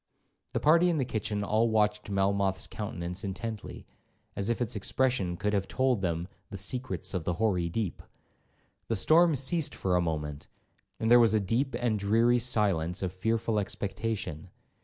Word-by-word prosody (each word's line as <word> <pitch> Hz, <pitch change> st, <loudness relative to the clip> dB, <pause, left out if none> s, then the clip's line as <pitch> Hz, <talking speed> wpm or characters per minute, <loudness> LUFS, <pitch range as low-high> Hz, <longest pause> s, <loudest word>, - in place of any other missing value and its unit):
The -, -, 0 dB
party 170 Hz, +4 st, +5 dB
in 170 Hz, -, +1 dB
the 135 Hz, -, 0 dB
kitchen 105 Hz, -3 st, -2 dB
all 110 Hz, +3 st, +2 dB
watched 105 Hz, -1 st, +1 dB
Melmoth's 100 Hz, -1 st, +1 dB
countenance 85 Hz, +5 st, -5 dB
intently, 105 Hz, +2 st, -6 dB, 0.5 s
as 100 Hz, +2 st, -1 dB
if 120 Hz, -, 0 dB
its 120 Hz, -1 st, -1 dB
expression 105 Hz, -4 st, 0 dB
could 105 Hz, +3 st, -1 dB
have 100 Hz, -1 st, 0 dB
told 130 Hz, -5 st, +1 dB
them 85 Hz, -1 st, -1 dB, 0.2 s
'the 100 Hz, -, -6 dB
secrets 100 Hz, -3 st, -2 dB
of 90 Hz, -4 st, -2 dB
the 90 Hz, -, -1 dB
hoary 90 Hz, -3 st, 0 dB
deep.' 105 Hz, +1 st, -3 dB, 0.9 s
The 115 Hz, -, 0 dB
storm 160 Hz, -, +5 dB
ceased 140 Hz, +4 st, 0 dB
for 90 Hz, -2 st, 0 dB
a 90 Hz, -, +3 dB
moment, 75 Hz, -3 st, -3 dB, 0.5 s
and 110 Hz, -, 0 dB
there 120 Hz, -, +9 dB
was 115 Hz, -2 st, +4 dB
a -, -, +4 dB
deep 120 Hz, +7 st, 0 dB
and 115 Hz, -4 st, 0 dB
dreary 115 Hz, +4 st, +3 dB
silence 100 Hz, -8 st, +1 dB
of 90 Hz, -, -1 dB
fearful 110 Hz, +3 st, 0 dB
expectation. 100 Hz, -4 st, -4 dB
105 Hz, 165 wpm, -29 LUFS, 95-120 Hz, 0.9 s, there